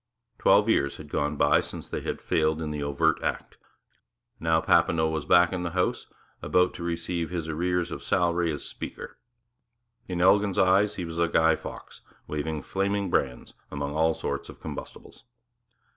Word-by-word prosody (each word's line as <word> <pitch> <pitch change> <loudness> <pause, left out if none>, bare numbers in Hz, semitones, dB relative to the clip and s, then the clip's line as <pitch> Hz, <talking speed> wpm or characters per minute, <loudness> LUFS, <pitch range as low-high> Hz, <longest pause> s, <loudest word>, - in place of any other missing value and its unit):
Twelve 105 +2 +5
years 70 -11 +1
had - - -11
gone 75 +1 -1
by 75 0 +4
since - - -7
they - - -4
had - - -4
failed 80 0 +1
in 80 -2 -3
the 75 -1 -4
overt 70 +3 +1
act. - - -4 0.8
Now 80 0 +2
Papineau 80 0 +3
was 80 -2 -3
back 90 +1 +5
in 90 - -2
the 85 - -2
House, 90 - 0 0.3
about 90 +5 +2
to 85 - -7
receive 85 0 -2
his 85 -3 -4
arrears 90 +2 -1
of - - -5
salary 85 -1 +1
as 75 - -5
Speaker. - - -8 0.9
In 90 -2 -3
Elgin's 100 +2 +4
eyes 95 +3 +4
he 90 - -4
was 85 0 -6
a 85 - +3
Guy 80 -1 +3
Fawkes - - -10 0.2
waving 75 0 -3
flaming 100 +1 -1
brands 65 -2 -1 0.2
among 70 0 -4
all 80 +1 +2
sorts - - -4
of - - -12
combustibles. - - -9
80 Hz, 170 wpm, -27 LUFS, 80-90 Hz, 0.9 s, Twelve